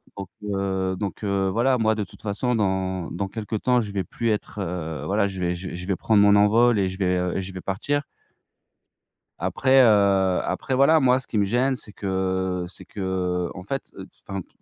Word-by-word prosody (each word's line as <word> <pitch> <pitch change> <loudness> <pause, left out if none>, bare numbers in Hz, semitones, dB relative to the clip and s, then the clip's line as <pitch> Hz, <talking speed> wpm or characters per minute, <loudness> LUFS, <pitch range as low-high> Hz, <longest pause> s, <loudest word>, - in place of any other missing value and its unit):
Donc 100 -2 -7
heu 95 -2 -1
donc 100 +1 -5
heu, 100 -1 +1
voilà, 125 +5 +2
moi 110 -2 +2
de 110 -1 -2
toute 95 - -13
façon, 115 +4 -1
dans 95 -4 -1
dans 95 +3 -3
quelque 110 +2 -5
temps, 125 +3 +2
je 105 -3 -5
vais 100 -2 -1
plus 115 +4 -3
être, 105 -1 -2
heu, 85 -4 -4
voilà, 100 +1 +1
je 95 -1 -6
vais 90 -1 0
je 90 +1 -6
vais - - -7
je 90 +2 -7
vais 95 - +1
prendre 105 +1 +3
mon 100 0 +6
envol 110 +2 +4
et 95 - +2
je 95 - -7
vais, 90 -2 +1
heu 90 0 -1
et - - -1
je 95 0 -8
vais 95 - -7
partir 130 +10 -1 1.4
après, 135 0 +3
heu, 100 -5 +4
après 130 - -2
voilà, 145 +5 +5
moi 130 -2 +4
ce 130 - -10
qui 110 - -2
me 100 - +3
gêne, 125 +6 +1
c'est 105 - -11
que 95 -2 -1
c'est 95 - -11
qu'en 90 -2 -3
fait, 135 +7 -3
heu, 95 - -8
t - - -24 0.2
enfin 95 -1 -3
p - - -31
100 Hz, 220 wpm, -24 LUFS, 95-110 Hz, 1.4 s, mon